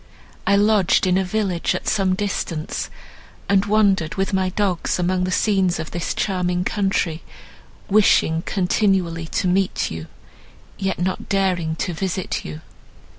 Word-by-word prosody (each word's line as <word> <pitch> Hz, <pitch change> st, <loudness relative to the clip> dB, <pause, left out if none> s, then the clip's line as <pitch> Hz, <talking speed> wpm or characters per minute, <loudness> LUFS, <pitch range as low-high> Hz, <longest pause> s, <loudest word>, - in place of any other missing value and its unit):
I 200 Hz, -, +5 dB
lodged 205 Hz, -3 st, +3 dB
in 180 Hz, -1 st, +2 dB
a 190 Hz, -, +2 dB
village 185 Hz, -2 st, -1 dB
at -, -, -5 dB
some 195 Hz, -3 st, +2 dB
distance, 185 Hz, -5 st, -3 dB, 0.6 s
and 195 Hz, 0 st, +2 dB
wandered 200 Hz, -6 st, +2 dB
with 195 Hz, 0 st, -1 dB
my 190 Hz, -1 st, +1 dB
dogs, 185 Hz, -2 st, 0 dB
among 180 Hz, 0 st, 0 dB
the 185 Hz, -, -2 dB
scenes 190 Hz, -2 st, +2 dB
of 160 Hz, -, -6 dB
this 170 Hz, -1 st, -3 dB
charming 180 Hz, -2 st, 0 dB
country, 190 Hz, -5 st, -1 dB, 0.7 s
wishing 190 Hz, -5 st, +3 dB
continually 180 Hz, -3 st, 0 dB
to 185 Hz, -, -1 dB
meet 185 Hz, +1 st, +1 dB
you, 80 Hz, 0 st, -6 dB, 0.7 s
yet 195 Hz, -1 st, -1 dB
not 185 Hz, +1 st, -2 dB
daring 185 Hz, -5 st, +1 dB
to 180 Hz, -, -3 dB
visit 185 Hz, +2 st, -3 dB
you." 75 Hz, 0 st, -7 dB
185 Hz, 140 wpm, -21 LUFS, 175-195 Hz, 0.7 s, I